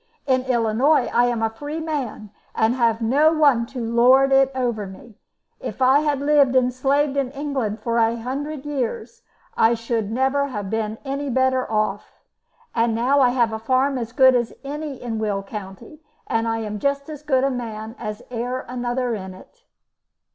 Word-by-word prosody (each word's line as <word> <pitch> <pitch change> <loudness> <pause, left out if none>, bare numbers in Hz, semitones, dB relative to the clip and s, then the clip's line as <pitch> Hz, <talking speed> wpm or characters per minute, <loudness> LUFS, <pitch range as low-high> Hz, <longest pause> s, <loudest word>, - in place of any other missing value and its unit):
In 260 -2 +1
Illinois 245 +3 +2
I 240 +1 +4
am 240 -2 -1
a 225 - +2
free 290 +7 -6
man, 270 -10 -4 0.2
and 220 +2 +2
have 230 -2 +1
no 285 +7 +4
one 285 -7 +3
to 255 - -7
lord 250 +4 +4
it 270 0 +4
over 235 -5 -1
me. 215 +3 -14 0.4
If - - -6
I 265 +2 +5
had 295 -2 0
lived 285 -3 +3
and 250 -1 +3
slaved 275 +2 +1
in 275 -2 0
England 270 -7 -3
for 235 +1 0
a 230 +1 +2
hundred 275 +4 -5
years 295 - -4 0.3
I 225 +1 +4
should 230 -2 -2
never 265 +4 +1
have 210 -7 -5
been 220 -1 -2
any 275 +1 -3
better 260 -1 +1
off, 215 -2 -2 0.5
and 230 -1 +1
now 255 +5 +2
I 250 - +5
have 240 -3 +1
a 220 - -3
farm 260 +3 +1
as 230 -1 -5
good 260 +1 +6
as 240 -2 0
any 290 -1 -5
in 230 -3 -4
Will 205 -2 -1
County, 195 +9 -9 0.2
and 225 0 -1
am 220 -2 -3
just 280 +3 -1
as 300 -2 -8
good 265 -4 +1
a 275 - +2
man 225 -2 -6
as 210 0 -6
e'er 245 +2 -3
another 245 0 -2
in 190 -3 -6
it." 485 - -18
250 Hz, 180 wpm, -22 LUFS, 225-275 Hz, 0.5 s, good